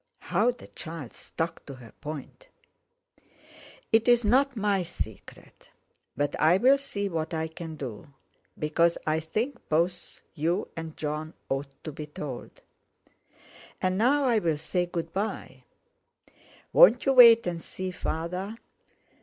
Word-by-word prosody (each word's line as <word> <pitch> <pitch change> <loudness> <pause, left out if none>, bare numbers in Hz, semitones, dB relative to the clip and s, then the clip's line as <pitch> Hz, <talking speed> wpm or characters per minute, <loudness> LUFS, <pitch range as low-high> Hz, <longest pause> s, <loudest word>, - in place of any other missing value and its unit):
How 200 +7 +1
the 245 0 -5
child 160 -6 -8
stuck 165 +1 -5
to 140 - -7
her 120 -3 -13
point 155 - -8 1.4
"It's 235 +2 +4
not 265 +5 +3
my 200 -2 +1
secret. 160 - -8 0.5
But 145 0 0
I'll 195 - +5
see 205 -7 -3
what 165 -2 -3
I 160 0 -1
can 160 0 -8
do, 135 0 -7 0.5
because 165 +3 +2
I 155 +1 +1
think 225 - -4
both 170 +3 -1
you 170 +5 -1
and 165 -1 -7
Jon 155 +1 -4
ought 135 0 -3
to 155 - -5
be 150 +1 -7
told. 145 -4 -8 1.2
And 185 +1 0
now 280 +6 +3
I'll 210 - +2
say 175 +3 -1
good 165 -1 -4
bye." 205 +3 -4 1.1
"Won't - - +7
you 270 - +4
wait 235 -3 +9
and 170 -2 -3
see 185 +3 -5
Father?" 180 +6 -4
170 Hz, 130 wpm, -27 LUFS, 155-215 Hz, 1.4 s, wait